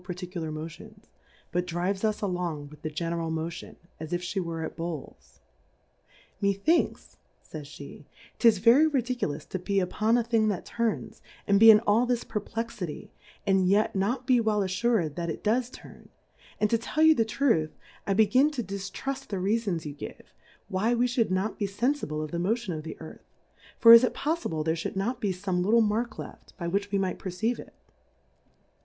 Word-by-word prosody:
particular 180 -3 -5
Motions, 155 +1 -9 0.4
but 180 +1 -1
drives 180 +4 -2
us 215 -1 0
along 175 -6 -3
with 150 0 -15
the 155 - -3
general 165 +1 -3
Motion, 160 +1 -5 0.2
as 160 +1 -7
if 175 0 -2
flie 190 +2 -2
were 165 -2 -4
at - - -6
Bowls. 165 -4 -7 1.0
Methinks, 200 - 0 0.3
fays 150 -3 -9
pe^ 145 0 -11 0.3
'tis 230 -3 +5
very 245 +10 +5
ridicu 255 -3 -1
lous 145 +1 -6
to 185 - -5
be 195 +2 0
upon 215 +5 +1
a 240 - +1
Thing 225 -1 +2
that 200 -4 -2
turns, 230 -2 -3 0.2
and 200 0 +3
be 225 +1 +9
in 215 -1 +9
all 225 +4 +2
this 245 -1 0
Perplexity, 210 -5 -5 0.3
and 190 -2 +3
yet 205 +2 +2
not 235 +7 -1
be 250 -2 +4
well 215 -2 +1
alTurM 190 -3 0
that 170 +2 -4
it 160 - -5
does 235 +3 +1
turn; - - -14 0.5
and 210 - +3
to 230 - +3
tell 305 +7 0
you 315 0 +8
the 230 - +2
Truth, 220 - 0 0.3
I 195 - +1
be 220 +1 +6
gin 255 +8 +4
to 250 -4 -2
diftruft 200 +8 -5
the 200 - -3
Reafons 195 -3 -1
you 145 - -5
give, 145 - -10 0.3
why 215 +5 +1
we 240 +1 +2
iliould 245 -2 +1
not 190 +3 -1
be 205 - 0
fenfible 200 - -1
of 155 - -7
the 170 - -2
Motion 205 +1 -1
of 155 - -4
the 160 - -8
Earth; 160 - -13 0.4
for 230 -1 +9
is 230 +1 +10
it 250 - 0
poffible 295 - -2
there 160 - +2
lliould 165 +3 -4
not 225 +6 -2
be 205 - 0
fome 180 -1 -2
little 225 +5 +4
Mark 220 +2 0
left, - - -10
by 170 -3 -4
which 200 +3 -1
we 200 - +1
might 190 -1 -1
perceive 200 +6 -2
it - - -12
200 Hz, 190 wpm, -27 LUFS, 170-230 Hz, 1.0 s, is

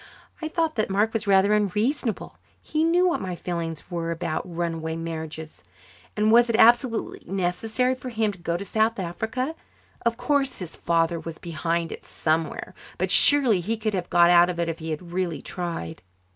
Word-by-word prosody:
I 315 - -2
thought 320 0 0
that 215 - 0
Mark 210 +3 +1
was 220 -2 -2
rather 195 +1 +4
unreasonable. 210 +4 -1 0.2
He 310 +1 -1
knew 350 +3 +4
what 345 - 0
my 185 -2 -4
feelings 165 -2 -4
about 170 -1 -2
run 170 -1 -2
away 160 0 -4
marriages 160 -1 -6
were. 90 - -35 0.5
And 215 - +4
was 240 +1 +6
it 230 - +1
absolutely 235 +1 +3
necessary 215 +7 0
for 255 0 -7
him 220 -3 0
to 195 - -13
go 170 0 -2
to 200 - -6
South 220 +2 +1
Africa? 220 - -3 0.5
Of 235 -1 +1
course 275 0 +1
his 180 -4 -6
father 165 0 +1
was 165 -1 -7
behind 165 0 -2
it - - -8
somewhere, 160 0 -2 0.2
but - - 0
surely 265 -9 +5
he 220 +6 -2
could 215 -1 -2
have 180 -2 -3
got 175 0 +5
out 175 0 +6
of 175 -1 -3
it 170 - 0
if 165 - -4
he 160 0 -6
had 170 +3 -5
really 180 -3 -1
tried. 165 - -5
185 Hz, 185 wpm, -25 LUFS, 170-225 Hz, 0.5 s, was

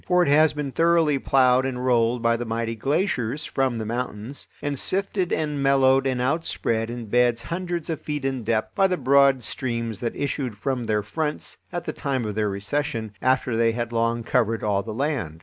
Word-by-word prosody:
For 180 0 +4
it 145 - 0
has 155 +2 +5
been 150 -2 -4
thoroughly 165 -2 +3
ploughed 130 -1 +4
and 130 -1 -3
rolled 120 -1 +2
by 115 0 +3
the 120 - -3
mighty 115 0 -2
glaciers 140 - -1
from 130 -3 0
the 110 - -3
mountains, 120 +2 -4
and 145 -2 -3
sifted 190 -1 -1
and 150 -2 -1
mellowed 135 -1 +4
and 130 -2 0
outspread 125 -5 -1
in 120 -1 -5
beds 120 +1 +2
hundreds 175 +2 -3
of 160 -3 -3
feet 150 -2 -4
in 135 -2 -1
depth 110 0 -1
by 195 - +3
the 180 -1 -1
broad 140 -2 +4
streams 115 -2 -3
that 120 - -3
issued 135 -6 -3
from 125 0 -2
their 105 -1 +1
fronts 150 +8 -3
at 175 -1 -3
the - - -4
time 135 -4 -2
of 105 - -3
their 105 0 0
recession, 110 +3 -2
after 130 -2 +1
they 115 0 +2
had 120 0 -3
long 115 0 0
covered 115 0 +1
all 100 -2 +1
the 110 +2 -7
land. 115 - -2
125 Hz, 200 wpm, -24 LUFS, 115-145 Hz, -, has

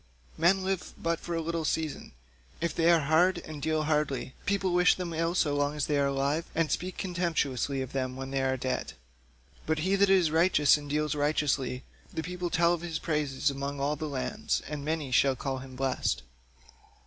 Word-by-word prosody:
Men 190 +4 +3
live 190 -1 -3
but 165 0 -1
for 170 - -4
a 165 - 0
little 165 0 -2
season; 155 - -2 0.5
if 170 +1 -1
they 165 0 +3
are 170 -2 +5
hard, 165 +6 +3
and 155 -3 -8
deal 155 +1 0
hardly, 150 -4 0
people 195 -2 +1
wish 180 0 +5
them 175 -2 -4
ill 165 +2 0
so 145 -5 +2
long 145 +1 0
as 150 - 0
they 145 -1 +1
are 140 - +3
alive, 140 +4 0
and 165 -2 +1
speak 185 0 -2
contemptuously 150 -7 -1
of 130 - -8
them 130 -1 -2
when 135 0 -6
they 135 -1 0
are 130 0 +1
dead, 130 +1 -3 0.7
but 160 0 +1
he 195 +1 +3
that 200 0 +4
is 185 -5 +4
righteous 160 -3 +5
and 145 -1 -6
deals 150 0 0
righteously, 145 -3 0 0.3
the 160 - -3
people 180 +1 -3
tell 170 +1 +3
of 170 - -3
his 170 -2 -3
praise 150 -3 0
among 140 +1 -4
all 145 +2 0
lands, 145 -4 -2
and 150 -1 -5
many 155 -3 -2
shall 135 +2 +4
call 135 +1 -3
him 130 0 -10
blessed." 125 - -1
150 Hz, 195 wpm, -29 LUFS, 140-170 Hz, 0.7 s, are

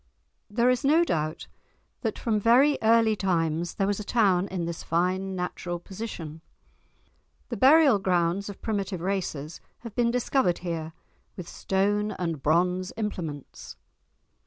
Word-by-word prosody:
There 235 +4 +2
is 250 - -1
no 310 +5 +4
doubt 155 - -2 0.6
that 225 -4 -2
from 220 -3 0
very 255 +7 +5
early 225 -1 +4
times 170 -3 -1
there 195 - 0
was 205 +1 -1
a - - -4
town 195 -4 +2
in 180 -4 -3
this 170 -1 -5
fine 185 +3 -1
natural 180 -1 -4
position. 170 -5 -8 1.1
The - - -4
burial 275 -4 +6
grounds 180 +1 0
of 200 - -10
primitive 200 -5 -2
races 175 -5 -3 0.2
have 230 -3 -9
been 235 +1 +1
discovered 245 -5 +1
here, 160 -2 -4 0.4
with 180 -3 -7
stone 205 +2 0
and 165 -5 -3
bronze 180 +4 +1
implements. 170 -10 -6
190 Hz, 135 wpm, -26 LUFS, 170-225 Hz, 1.1 s, burial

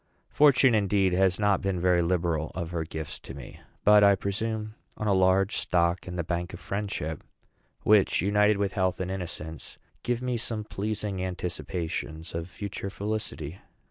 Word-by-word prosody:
Fortune, 135 -4 +5
indeed, 100 -3 +2
has 95 0 +3
not 105 -2 +2
been 95 -2 -1
very 90 0 +3
liberal 85 -2 0
of 85 -2 -4
her 85 -2 -1
gifts 80 -1 -6
to 70 - -10
me; 70 -3 -10 0.2
but 105 0 +7
I 100 0 +7
presume 110 +3 -3 0.2
on 110 - -3
a 105 - +3
large 95 +1 +3
stock 85 +1 +1
in 90 - -5
the 85 - -1
bank 85 +2 -3
of - - -11
friendship, 95 -7 -4 0.6
which, 105 -2 +4
united 105 +1 +3
with 100 -1 -1
health 95 -3 0
and 95 0 -2
innocence, 85 -4 -6 0.2
give 120 -1 -1
me 125 -1 0
some 110 -1 -2
pleasing 105 -2 -3
anticipations 85 -2 -4
of 85 +1 -4
future 100 0 -5
felicity. 95 -6 -4
95 Hz, 165 wpm, -27 LUFS, 85-105 Hz, 0.6 s, but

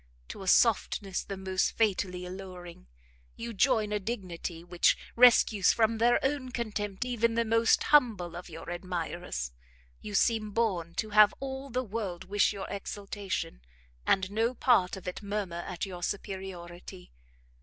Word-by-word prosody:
To - - -7
a 190 - -7
softness 200 -3 +2
the 195 - -6
most 190 -1 0
fatally 185 -4 0
alluring, 180 - -9 0.5
you 235 0 -6
join 220 -1 +2
a 210 - 0
dignity 185 -5 -5
which 175 0 +2 0.2
rescues 230 -4 +6
from 225 -1 +2
their 240 +1 +4
own 270 -2 -1
contempt 215 -3 -3
even 230 -2 +1
the 235 0 +2
most 230 +1 +3
humble 225 - +3
of 175 +1 -8
your 165 +1 -8
admirers. 175 - -4 0.5
You 210 -1 -6
seem 215 0 +2
born 185 -8 -1
to 215 -1 -3
have 210 0 +6
all 270 0 -5
the 255 +1 -1
world 195 -5 -4
wish 200 +2 +2
your 200 -2 -5
exaltation, 200 - -5 0.4
and 190 - +1
no 225 +4 0
part 195 -8 +3
of 190 - -11
it 180 - -4
murmur 200 -4 -3
at 180 0 -3
your 180 -2 -8
superiority. 185 -2 -6
200 Hz, 150 wpm, -29 LUFS, 180-230 Hz, 0.5 s, rescues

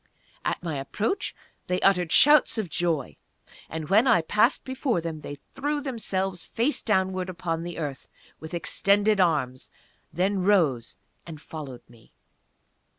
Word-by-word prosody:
At - - -2
my 160 -5 -3
approach 215 - -2 0.3
they 180 0 0
uttered 180 -4 +3
shouts 295 -3 +6
of 200 -7 -3
joy; 165 -6 -1 0.5
and 160 -1 -5
when 215 +7 +4
I 225 -9 +4
passed 210 - +2
before 260 - -1
them 160 -2 -5
they 145 - -7 0.2
threw 290 +2 -2
themselves, 195 -9 -3
face 250 +7 -1
downward, 190 -3 0
upon 170 -2 -3
the 170 0 -6
earth, 145 -5 -5 0.3
with 160 +2 -7
extended 200 +4 +2
arms, 140 -8 +1 0.4
then 190 +3 0
rose 165 - +2 0.3
and 160 -3 -8
followed 145 -5 -9
me. 115 -2 -21
180 Hz, 140 wpm, -26 LUFS, 160-210 Hz, 0.5 s, shouts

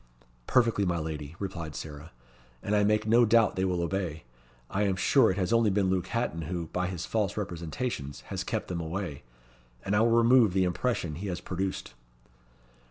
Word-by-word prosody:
"Perfectly, 115 -4 +3
my 90 -2 0
lady," 75 -1 -5
replied 85 -7 -5
Sarah, 75 +1 -8 0.5
"and 105 - 0
I 105 - +4
make 105 +1 +2
no 115 +2 +5
doubt 115 -1 +4
they 95 - 0
will 90 -2 0
obey. 85 -3 -3 0.4
I 100 - -2
am 100 -2 +2
sure 115 +6 +4
it 95 - -1
has 95 +3 0
only 115 -2 +4
been 95 -1 +1
Luke 95 -2 0
Hatton 115 -8 -2
who, 85 -3 -3
by 90 0 0
his 90 -2 -4
false 105 -4 -1
representations, 85 - -4
has - - -5
kept - - -3
them 85 -2 -3
away, 85 -2 -4 0.6
and 100 +1 +1
I - - +4
will 115 +1 +4
remove 115 -2 +5
the 95 -1 +3
impression 90 -2 -1
he 90 +7 -5
has 90 -2 -3
produced." 95 +2 -4
95 Hz, 185 wpm, -29 LUFS, 85-105 Hz, 0.6 s, no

